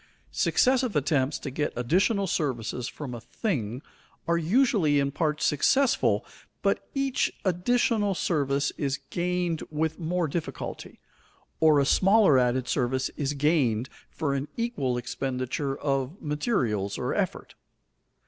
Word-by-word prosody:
_ - - -30 0.3
Successive 255 -3 +2
attempts 145 -1 +1
to 140 - -6
get 150 +3 -1
additional 190 - +2
services 125 - -2
from 140 -5 -7
a 120 - -7
thing 125 - -3 0.4
are 170 - +3
usually 170 - +3
in 140 0 0
part 150 0 -1
successful, 265 - +2 0.4
but - - 0
each 275 -1 +1
additional 205 +2 +1
service 140 -5 0
is 140 -2 0
gained 175 -2 -1
with 160 +1 -2
more 170 0 0
difficulty, 160 +3 -5 0.6
or 155 -2 +5
a 140 - +3
smaller 195 -5 +5
added 125 0 +1
service 130 0 0
is 145 -1 -3
gained 140 -5 +1 0.2
for 145 -4 -2
an 140 +1 -2
equal 145 - -1
expenditure 130 +2 -3
of 140 +4 -2
materials 130 - -1
or - - -2
effort. - - -2
150 Hz, 130 wpm, -27 LUFS, 130-180 Hz, 0.6 s, or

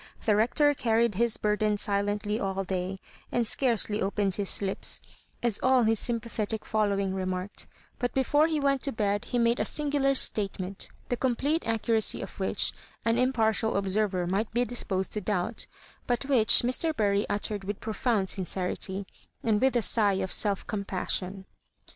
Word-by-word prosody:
The 215 - +3
Hector 290 +7 +3
carried 230 -3 +1
his 230 +2 0
burden 210 0 0
sil^Qtly 205 +1 -1
all 195 0 -2
day, 185 0 -4 0.3
and 240 -1 +1
scarcely 225 -3 +1
opened 195 0 0
his 200 0 +2
lips, 195 -1 0 0.4
as 235 -4 +4
all 260 -1 +4
his 220 -1 +3
sympathetic 225 -2 -2
following 200 -3 0
remarked; 185 +1 -4 0.3
but 245 0 -1
before 290 +4 +3
he 315 -2 -1
wdat 275 -1 +1
to 275 - -1
bed 205 -3 -1
he 245 - -2
made 235 0 +2
a - - +2
singular 285 -2 +1
statement, 195 -5 0 0.2
the 245 - -1
complete 270 +6 0
accuracy 225 -1 +2
of - - -10
which - - +2 0.3
an 230 +1 +2
impartial 225 -4 +1
observer 195 -2 0
might 195 +5 -1
be 245 +1 +2
disposed 195 -6 -2
to 210 - -3
doubt, 205 +3 -2 0.4
but 245 +2 -1
which 250 -6 +5
Mr. 295 +6 +2
Bury 205 -1 +1
uttered 205 0 -1
with 200 +1 -5
profound 220 -2 -1
sincerity, 190 +1 -2 0.4
and 215 -2 +1
with 265 -1 +2
a 240 - +2
sigh 205 -3 +3
of 190 -1 -2
self 200 -2 +1
compassion. 190 -1 -3
215 Hz, 160 wpm, -27 LUFS, 200-240 Hz, 0.4 s, which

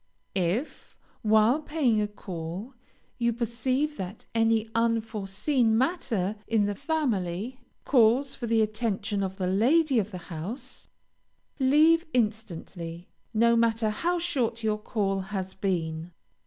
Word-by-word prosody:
If, 190 - -2 0.2
while 220 +6 +4
paying 285 -8 +1
a 210 - 0
call, 190 +3 -7 0.5
you 235 0 +2
perceive 255 +6 -1
that 190 +3 -6
any 225 -1 +2
unforeseen 225 +1 +1
matter 225 - 0
in 220 -3 +2
the 205 - -1
family, 235 - -2 0.3
calls 255 +2 +4
for 240 - -5
the 225 -1 +3
attention 215 -1 -1
of 190 -1 -2
the 190 -2 -2
lady 255 - +3
of 205 -1 -1
the 190 - -6 0.2
house, 230 - -6 0.7
leave 310 +5 +5
instantly, 180 -6 -3 0.2
no 235 +1 +4
matter 230 -1 +2
how 345 +11 0
short 260 -10 -1
your 215 -1 +1
call 200 -3 -1
has 190 -1 -4
been. 170 -3 -2
220 Hz, 125 wpm, -27 LUFS, 195-250 Hz, 0.7 s, leave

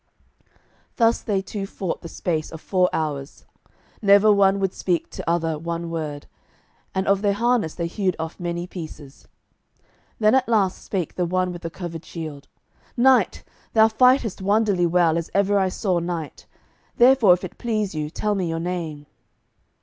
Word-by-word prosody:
Thus 230 -1 +3
they 195 -3 -1
two 195 0 -5
fought 190 -3 -4
the - - -8
space 160 -3 -3
of 160 - -8
four 180 +2 +1
hours. 145 -3 -4 0.6
Never 205 +1 +6
one 200 -1 +3
would 195 -1 -1
speak 175 -3 -2
to - - -5
other 165 -2 0
one 170 +1 -4
word, 150 -3 -4 0.7
and 190 +1 -1
of 200 0 +3
their 205 -1 +2
harness 230 -5 +1
they 170 - -2
hewed 185 +1 -1
off 160 0 -6
many 175 0 -3
pieces. 155 -6 -10 0.9
Then 215 -1 +3
at 260 -1 +3
the 235 - 0
last 195 -4 +1
spake 185 -6 -3
the 180 - -1
one 185 +1 0
with 175 -1 -8
the 165 - -4
covered 170 -1 -7
shield; 155 -4 -8 0.5
"Knight, 260 +1 +3 0.3
thou 220 -1 +6
fightest 250 -2 +3
wonderly 200 -3 +2
well 170 -1 +3
as 165 - -6
ever 200 0 +3
I 190 -1 +1
saw 185 -2 0
knight; 170 -3 -5 0.5
therefore 245 -6 +6
if 180 - -12
it 185 - -8
please 215 -5 -1
you 150 -1 -3
tell 210 +6 -1
me 185 -4 -1
your 165 0 -2
name." 165 -4 -4
180 Hz, 170 wpm, -23 LUFS, 165-205 Hz, 0.9 s, Never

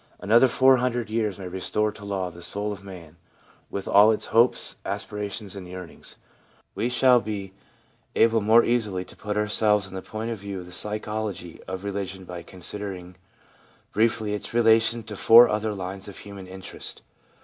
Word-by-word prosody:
Another 115 +5 +5
four 130 +1 +5
hundred 120 -3 -1
years 110 -4 0
may 95 -2 -7
restore 95 +4 -1
to 105 0 -13
law 95 -3 -3
the 85 +1 -13
soul 105 +4 -2
of 100 -1 -11
man, 85 -4 -11 0.5
with 100 - -5
all 105 +2 +7
its 110 - -1
hopes, 115 +2 +3
aspirations 105 -1 -5
and 95 -2 -8
yearnings. 90 -1 -9 0.6
We 120 - -1
shall 125 0 +5
be 100 -3 -5 0.6
able 115 0 +4
more 110 +3 +6
easily 105 -6 0
to - - -15
put 105 0 -4
ourselves 105 -1 +2
in 95 - -12
the 95 - -5
point 110 +3 -5
of 115 - -4
view 100 -1 -6
of 90 - -8
the 90 - -13
psychology 105 -3 -4
of 95 0 -5
religion 100 -1 -4
by 90 -1 -7
consider 100 +3 -7
ing 90 -1 -10 0.8
briefly 110 -1 +1
its 105 +2 -5
relation 115 0 +4
to 105 0 -8
four 115 +4 +8
other 110 0 -1
lines 95 0 -6
of 100 - -9
human 100 -2 -10
interest. 95 0 -8
105 Hz, 175 wpm, -25 LUFS, 95-110 Hz, 0.8 s, four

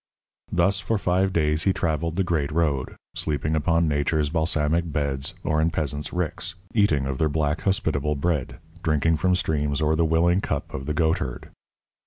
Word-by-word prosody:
Thus 90 +2 +2
for 110 +4 -1
five 95 0 +1
days 80 -2 +1
he 95 - +4
travelled 80 -1 -1
the 95 - +1
great 80 -5 -1
road, 75 -5 0 0.2
sleeping 75 +1 0
upon 85 +1 +2
Nature's 75 0 +1
balsamic 80 0 0
beds 70 -2 -1
or 75 0 +1
in 80 - +3
peasants' 75 -2 -3
ricks, 90 +1 -3 0.2
eating 80 -11 +3
of 65 -1 -3
their 80 - +2
black, 75 +1 0
hospitable 75 -6 0
bread, 75 -2 -1 0.2
drinking 80 0 +2
from 90 +3 +2
streams 75 -4 0
or 80 0 +2
the 85 - +2
willing 85 +3 +3
cup - - -3
of 65 +1 -5
the 75 - -1
goatherd. 80 -6 -1
80 Hz, 170 wpm, -24 LUFS, 75-85 Hz, 0.2 s, he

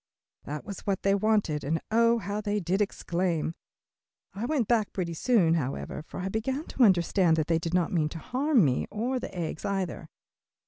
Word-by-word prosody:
That 150 +1 -5
was 200 -3 -6
what 195 -2 -2
they 195 - +3
wanted, 200 -7 +1
and 160 +4 0
oh 230 +1 +4
how 205 -1 -3
they 210 0 -1
did 190 +2 0
exclaim! 175 -5 -1 0.8
I 210 +5 -3
went 270 -8 0
back 225 -4 +2
pretty 175 -3 -2
soon, 180 -2 +3
however, 145 -2 -2
for 160 - -8
I 185 - -2
began 260 +9 -2
to 260 - +2
understand 180 -4 +4
that 155 - +1
they 165 0 +1
did 165 +1 -2
not 180 0 +1
mean 155 -3 +1
to 165 - -7
harm 255 - +2
me 130 -2 0
or 250 +4 -1
the - - -6
eggs 165 -2 -4
either. 185 -5 -3
195 Hz, 190 wpm, -28 LUFS, 165-220 Hz, 0.8 s, oh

